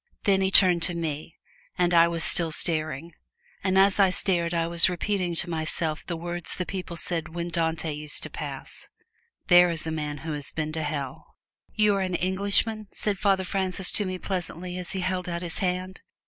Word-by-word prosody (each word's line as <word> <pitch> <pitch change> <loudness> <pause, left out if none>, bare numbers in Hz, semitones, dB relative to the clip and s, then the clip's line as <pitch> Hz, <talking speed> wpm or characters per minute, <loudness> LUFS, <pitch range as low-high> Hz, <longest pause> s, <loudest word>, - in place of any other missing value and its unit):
Then 195 -1 +3
he 190 - +2
turned 185 -3 +5
to 175 +1 +3
me, 160 0 -5 0.4
and 180 -1 +2
I 170 0 +6
was 165 -1 -3
still 165 -2 0
staring. 155 0 -2 0.5
And 190 0 +1
as 195 +1 +4
I 195 -1 +6
stared 175 -2 0
I 165 -1 0
was 170 +1 +6
repeating 180 -1 -1
to 175 - +4
myself 160 -1 -1
the 170 - -4
words 175 +1 -2
the 180 - -3
people 180 -3 -6
said 165 +1 -3
when 170 0 -3
Dante 165 -2 -1
used 150 0 -2
to - - -4
pass, - - -6 0.6
"There 175 -1 +6
is 165 -2 0
the 160 - -2
man 150 -2 -3
who 160 - -3
has 145 -2 -3
been 155 -1 -3
to 160 0 -3
Hell!" 145 -3 -5 0.4
"You 210 -1 +4
are - - -1
an 185 -1 -1
Englishman?" 200 +4 +1
said 205 -3 -1
Father 195 -2 +2
Francis 190 0 0
to 210 - +1
me 185 0 -3
pleasantly 180 -1 -4
as 180 - -6
he 190 - -2
held 185 0 -2
out 170 0 -4
his 170 -1 0
hand. 185 0 -3
175 Hz, 200 wpm, -26 LUFS, 165-185 Hz, 0.6 s, I